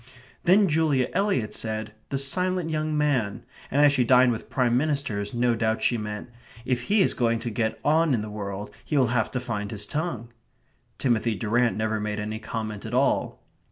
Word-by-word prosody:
Then 195 +3 +5
Julia 150 -5 +2
Eliot 195 - 0
said 110 -1 -4 0.2
"the 140 - -1
silent 180 +4 +1
young 155 0 -1
man," 125 -7 0 0.2
and 145 +3 +4
as 145 - +6
she 135 -3 +3
dined 125 +1 +5
with 115 - -5
Prime 125 -3 +1
Ministers, 130 -8 -1
no 120 0 +2
doubt 110 -1 0
she 120 - +3
meant: 105 +1 -5 0.3
"If 125 -1 0
he 205 -1 +5
is - - +1
going 115 -2 +1
to 115 +1 -4
get 110 0 -1
on 155 -1 +3
in 105 - -2
the 105 - -7
world, 100 -1 -5
he 150 - -1
will 130 - +5
have 110 -3 +1
to 130 - -2
find 105 -5 -4
his 105 -1 -3
tongue." 145 -5 -3 0.7
Timothy 115 -3 +1
Durrant 115 +4 +1
never 110 0 -1
made 105 0 -3
any 110 +1 -4
comment 110 -2 -5
at 115 +2 -4
all. 135 +2 +1
120 Hz, 190 wpm, -25 LUFS, 110-145 Hz, 0.7 s, as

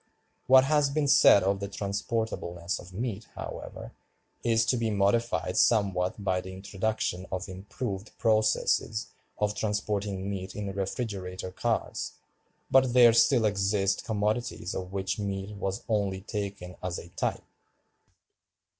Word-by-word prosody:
What 130 0 +8
has 150 0 +3
been 145 +1 0
said 100 -7 +7
of 100 +1 +1
the 100 - -3
transportableness 100 -4 -3
of 90 - -12
meat, 110 +1 -4
however, - - -7 0.5
is 115 -1 +3
to 115 - +2
be 115 -1 0
modified 100 -3 +1
somewhat 100 -3 +2
by 95 -2 +1
the 95 0 -8
introduction 95 -1 -2
of 95 +1 -3
improved 100 +2 -6
processes 110 0 +1 0.3
of 105 0 0
transporting 105 -2 -2
meat 95 -2 -5
in 100 -2 -4
refrigerator 95 -2 -4
cars; - - -2 0.6
but 130 -2 +5
there 120 -2 +8
still 115 0 +4
exist 100 -1 +1
commodities 110 -2 -1
of 90 0 -5
which 95 0 -2
meat 100 0 -3
was 95 -1 -3
only 100 -4 0
taken 100 -3 -5
as 90 -1 -3
a 85 - -9
type. - - -2
100 Hz, 130 wpm, -28 LUFS, 95-110 Hz, 0.6 s, What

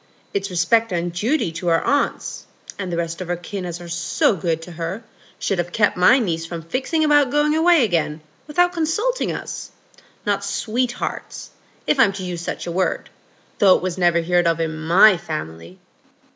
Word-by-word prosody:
It's 200 0 -2
respect 215 +5 +2
and 175 -1 -2
duty 215 - 0
to 170 +2 -6
her 165 -1 +2
aunts, 285 0 -1 0.3
and 185 -3 -4
the 170 - -2
rest 170 +1 -3
of 180 - -5
her 175 - -1
kin 180 +2 -6
as 175 0 -5
are 175 - -9
so 170 +4 +1
good 165 -2 -1
to 175 - -10
her, 170 +6 -5 0.3
should 195 - -1
have 175 0 -2
kept 210 +3 +2
my 180 +9 +6
niece 170 -10 -1
from 165 0 -6
fixing 265 - -1
about 290 -3 +4
going 295 +2 +2
away 325 -2 +4
again 160 -6 0 0.3
without 355 +4 +2
consulting 390 +10 0
us; - - -6 0.6
not 200 -1 0
sweethearts, 240 +5 -3 0.3
if 280 - +1
I'm 195 -6 +5
to 190 -1 -6
use 175 -2 -4
such - - -5
a 175 - -4
word, 185 +2 -1 0.5
though 195 -2 +6
it - - -2
was 185 0 -3
never 175 -1 +3
heared 175 +1 +2
in 165 -1 0
my 175 +6 +5
family." 85 - -7
180 Hz, 185 wpm, -21 LUFS, 170-240 Hz, 0.6 s, my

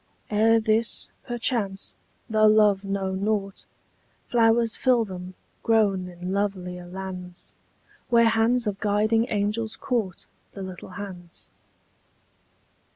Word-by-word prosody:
Ere 225 +2 +4
this, 220 +1 0 0.2
perchance, 230 -5 -1 0.3
though 215 -2 +4
love 210 -2 +4
know 195 -1 -2
nought, 200 0 -2 0.7
Flowers 230 -1 +3
fill 245 -3 +3
them, 185 -1 -8 0.3
grown 205 -5 +2
in 180 +1 -6
lovelier 180 -3 -3
lands, 180 -1 -8 0.6
Where 235 -2 +5
hands 230 +2 +2
of 200 -2 -2
guiding 215 +3 +2
angels 215 +2 -1
caught 225 -8 -2 0.3
The 195 - -7
little 185 -1 -8
hands. 180 -4 -9
205 Hz, 105 wpm, -25 LUFS, 190-225 Hz, 0.7 s, Where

